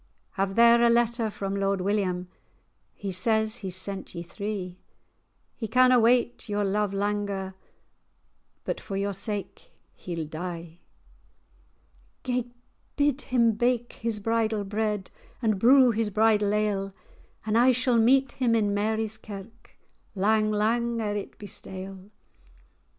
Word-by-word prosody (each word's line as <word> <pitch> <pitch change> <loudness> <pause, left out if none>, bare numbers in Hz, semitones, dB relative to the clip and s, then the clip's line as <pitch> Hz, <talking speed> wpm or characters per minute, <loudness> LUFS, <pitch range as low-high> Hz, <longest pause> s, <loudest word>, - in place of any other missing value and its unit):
"Have 195 -1 -2
there 235 0 +6
a 235 - +5
letter 235 -1 +2
from 195 -1 -4
Lord 195 0 0
William; 185 -2 -1 0.7
He 200 -1 -5
says 220 +4 +1
he's 190 -6 -3
sent 190 +1 -2
ye 170 - -5
three; 185 -1 -5 0.8
He 225 - -5
canna 255 +2 +5
wait 240 0 +2
your 205 0 0
love 205 +1 0
langer, 200 -1 -2 1.1
But - - -3
for 195 - -5
your 200 0 -1
sake 205 - -5 0.2
he'll 170 -3 -5
die." 170 +1 -7 1.4
"Gae 250 -1 -2 0.5
bid 290 -1 +1
him 235 -2 +2
bake 240 +2 0
his 225 -2 -3
bridal 220 0 0
bread, 210 -1 -2 0.3
And 215 -5 0
brew 255 +2 +6
his 225 -1 -1
bridal 210 0 +3
ale; 200 -2 -1 0.5
And 215 0 0
I 245 +3 +6
shall 250 -1 +2
meet 265 +4 +4
him 240 -3 +1
in 205 -2 +1
Mary's 220 +1 -1
Kirk, 215 +3 -11 0.4
Lang, 215 +2 +2
lang 230 +3 0
ere 210 -2 -2
it 205 - -6
be 210 - -10
stale." 190 0 -8
210 Hz, 135 wpm, -26 LUFS, 195-235 Hz, 1.4 s, there